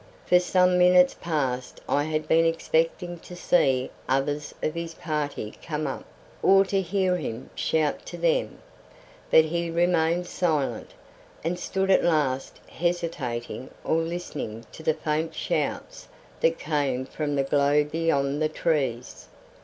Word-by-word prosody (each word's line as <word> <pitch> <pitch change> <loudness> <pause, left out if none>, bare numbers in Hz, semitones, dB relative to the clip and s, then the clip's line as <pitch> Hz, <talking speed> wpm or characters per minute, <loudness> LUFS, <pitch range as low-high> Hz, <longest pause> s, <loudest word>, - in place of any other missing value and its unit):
For 180 - +5
some 180 0 +3
minutes 180 0 +6
past 135 -6 -2
I 145 +1 +1
had 155 0 -2
been 165 +1 +4
expecting 165 +1 0
to 180 - -11
see 135 -7 +2 0.2
others 145 +3 0
of 155 - 0
his 170 0 -5
party 145 -8 -3
come 155 -1 -3
up, - - -4 0.4
or 195 0 +6
to 195 0 0
hear 185 0 +1
him 120 -5 -6
shout 155 -2 0
to - - -7
them, - - +1 0.7
but 160 - +6
he 170 +1 -2
remained 170 0 +2
silent, 160 -6 -1 0.5
and 175 +2 -2
stood 190 +1 0
at 190 - +5
last 145 -6 0
hesitating 160 -9 -3
or 160 - +1
listening 165 -9 -4
to - - -11
the 160 -1 +1
faint 160 +1 -2
shouts - - -3 0.3
that 165 0 +2
came 140 -4 -1
from 145 +1 -3
the 140 - +2
glow 145 +1 +3
beyond 150 -2 0
the 155 - +2
trees. 135 -7 -2
160 Hz, 140 wpm, -26 LUFS, 145-175 Hz, 0.7 s, minutes